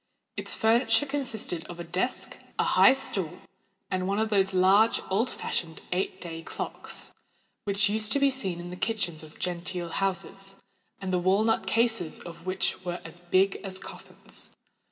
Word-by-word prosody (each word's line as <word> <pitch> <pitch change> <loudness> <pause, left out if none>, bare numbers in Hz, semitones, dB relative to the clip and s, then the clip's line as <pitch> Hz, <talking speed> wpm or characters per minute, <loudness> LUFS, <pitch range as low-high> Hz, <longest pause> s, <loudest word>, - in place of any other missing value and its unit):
Its - - -3
furniture 225 +2 +4
consisted 245 - -3
of 175 -1 -9
a - - -3
desk, 180 +9 -2 0.2
a - - +3
high - - +7
stool, 190 -10 +1 0.5
and 185 0 0
one 200 +1 +1
of 220 0 +1
those 195 -2 +3
large, 195 +4 +5
old 220 +6 +2
fashioned 160 -2 -3
eight 185 +1 -1
day 165 -2 -6
clocks, - - -4 0.5
which 200 +1 +5
used 215 +1 +1
to 280 - +4
be 275 0 +4
seen 195 -10 -2
in 175 0 -7
the - - -5
kitchens 185 -6 -1
of 155 -1 -13
genteel 175 0 -2
houses, 195 +1 -1 0.4
and 190 -1 -3
the 180 - +3
wall 190 +4 +3
nut 225 0 +2
cases 225 -7 +1
of 170 0 -10
which 185 0 0
were 175 -1 -3
as 165 +1 -9
big 185 +2 +2
as 190 -2 -5
coffins. - - -9
190 Hz, 170 wpm, -28 LUFS, 175-220 Hz, 0.5 s, high